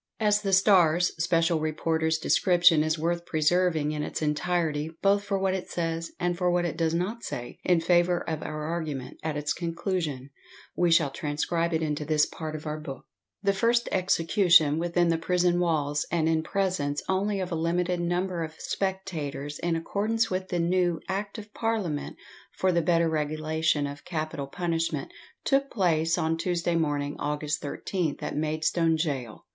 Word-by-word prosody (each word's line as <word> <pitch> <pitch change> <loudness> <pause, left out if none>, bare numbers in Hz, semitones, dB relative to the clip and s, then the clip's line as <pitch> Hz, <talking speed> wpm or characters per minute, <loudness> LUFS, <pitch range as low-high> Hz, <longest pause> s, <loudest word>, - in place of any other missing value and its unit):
As 210 -1 +3
the 200 -2 -1
Star's 180 -3 +4
special 165 -1 +2
reporter's 160 +1 0
description 175 -1 +4
is 155 +1 0
worth 170 +2 -1
preserving 160 -1 +1
in 150 -1 -3
its - - -3
entirety, 155 0 0
both 200 +1 +3
for 200 -1 -1
what 190 -1 +1
it 190 -1 -4
says, 165 -1 -3
and 175 0 0
for 180 0 +1
what 175 0 +1
it 165 - -2
does 165 -1 0
not 200 +7 -2
say. 120 -1 -6
in 175 -2 +3
favour 175 +1 +2
of 160 -1 -2
our 155 0 -5
argument, 150 -5 -4
at 155 -2 -2
its 150 0 -1
conclusion, 165 -6 -3 0.4
we 175 -1 +2
shall 165 -4 +4
transcribe 155 +4 -1
it 160 -1 0
into 150 -1 -2
this 150 0 +3
part 155 -1 -6
of 155 - -7
our 155 0 -3
book: 140 -3 -8 0.4
The 200 0 +3
first 235 +4 +2
execution 170 -4 +4
within 175 0 +1
the 165 -1 +1
prison 175 +1 +2
walls, 150 -4 +1
and 160 -1 +1
in 160 -1 +2
presence 180 -6 -1
only 195 +2 0
of 185 -1 -3
a - - 0
limited 175 +2 0
number 175 0 -1
of 160 0 -7
spectators, 160 -7 -3
in 170 -1 0
accordanoe 215 +6 0
with 185 0 -2
the 180 - -2
new 175 -1 +1
Act 200 +3 -3
of 215 -1 -10
Parliament 210 -10 -2 0.4
for 185 - +2
the 170 -1 +2
better 170 0 +2
regulation 155 -1 0
of 140 0 -7
capital 155 -4 -4
punishment, 165 -2 -2 0.3
took 275 0 +2
place 165 -5 +1
on 165 -1 0
Tuesday 175 0 -1
morning, 145 -3 0
August 150 0 -2
13th, 160 +2 -3
at - - -3
Maidstone 160 +2 +1
Gaol. 135 -8 -3
165 Hz, 170 wpm, -27 LUFS, 155-180 Hz, 0.4 s, Star's